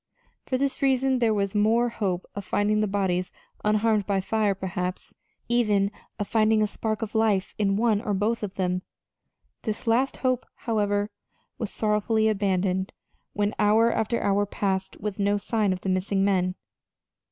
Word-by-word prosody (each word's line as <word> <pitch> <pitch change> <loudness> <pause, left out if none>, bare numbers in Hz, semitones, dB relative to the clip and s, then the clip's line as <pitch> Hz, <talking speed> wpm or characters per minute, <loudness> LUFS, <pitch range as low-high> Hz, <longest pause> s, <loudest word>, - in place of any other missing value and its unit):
For 255 - 0
this 275 +3 -1
reason 265 -1 +2
there 230 -2 +3
was 200 -2 0
the 210 - 0
more 230 +3 +3
hope 190 -6 -2
of 200 - -5
finding 210 +2 +1
the 215 - +1
bodies 190 -2 0 0.3
unharmed 215 -1 +2
by 200 -1 +1
fire 205 +1 +1
perhaps, 185 -1 -4 0.3
even, 210 -4 +2 0.3
of 205 - -3
finding 215 0 +3
a - - +4
spark 215 +1 -3
of 215 - -5
life 220 -4 +1
in 195 -1 +2
one 220 -2 +2
or 205 -2 -1
both 215 +4 0
of 200 -3 -5
them. 180 -1 0 0.8
This 215 -2 -4
last 245 +4 +2
hope, 255 -2 0
however, 205 -2 0 0.5
was 220 - -2
sorrowfully 220 +1 +1
abandoned 190 -2 0 0.4
when 205 0 0
hour 220 +3 +4
after 225 +1 0
hour 200 0 +1
passed 190 -1 -2
with 205 0 -4
no 205 +1 +2
sign 210 -1 0
of 185 -1 -3
the - - -5
missing 195 +1 +1
men. 185 -2 +1
210 Hz, 165 wpm, -26 LUFS, 195-220 Hz, 0.8 s, a